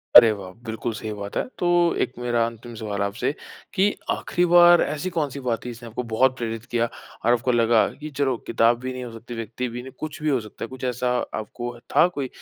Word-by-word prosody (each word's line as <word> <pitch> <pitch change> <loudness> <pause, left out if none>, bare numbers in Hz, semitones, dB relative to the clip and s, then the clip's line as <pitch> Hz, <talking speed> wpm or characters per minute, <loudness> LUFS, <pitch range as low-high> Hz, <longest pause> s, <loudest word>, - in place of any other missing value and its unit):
अरे 115 -2 +11
वाह! 100 -3 -6
बिल्कुल 110 +1 -3
सही 110 0 -5
बात 100 -1 -7
है - - +2 0.2
तो 175 - +1 0.3
एक - - 0
मेरा 120 -1 +1
अंतिम 115 +1 -9
सवाल 105 -2 -3
आपसे 100 +5 0 0.4
कि, 205 +1 +3
आखिरी 175 - +1
बार 175 0 +8
ऐसी 150 +5 -1
कौन-सी 145 -3 -1
बात 120 -4 -2
थी - - -3
जिसने 120 0 -9
आपको 120 +3 -4
बहुत 130 +3 +3
प्रेरित 115 -1 -4
किया 120 -3 +1 0.4
और - - +5
आपको 125 +1 +1
लगा 115 -1 +4
कि 150 +1 -8
चलो 135 -4 +1
किताब 115 +1 +3
भी 130 +1 -4
नहीं 130 0 -5
हो 120 - -7
सकती, 115 +2 -9
व्यक्ति 115 +2 -4
भी 120 +1 -5
नहीं, 130 +1 -10
कुछ 155 +1 -6
भी 155 - +2
हो 135 -3 +3
सकता 110 - -9
है। - - -3
कुछ 130 0 -10
ऐसा 125 0 0 0.2
आपको 120 +3 -5 0.2
था - - +7
कोई 145 -7 -4
120 Hz, 225 wpm, -24 LUFS, 115-130 Hz, 0.4 s, अरे